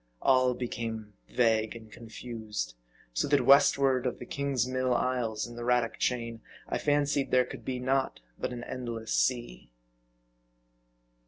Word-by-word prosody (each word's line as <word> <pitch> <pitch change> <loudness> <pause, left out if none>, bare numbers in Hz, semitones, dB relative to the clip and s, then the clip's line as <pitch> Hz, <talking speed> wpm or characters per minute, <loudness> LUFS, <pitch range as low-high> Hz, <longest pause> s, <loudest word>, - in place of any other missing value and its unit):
All 130 -1 +4
became 115 -3 -4 0.2
vague 110 -2 +2
and 110 -2 -11
confused; 110 - -6 0.4
so - - 0
that 140 -3 +3
westward 140 -2 +5
of 125 - -3
the - - -8
Kingsmill 130 -2 0
isles 120 -3 0
and 120 - -9
the 120 - -6
Radack 120 -1 +1
chain, 115 -2 -1 0.3
I - - -1
fancied 145 -1 +1
there 125 0 +4
could - - -9
be 130 -1 -3
naught 130 +1 0 0.2
but - - -2
an 120 -1 -6
endless 120 -4 -4
sea. 120 - 0
125 Hz, 140 wpm, -29 LUFS, 115-130 Hz, 0.4 s, westward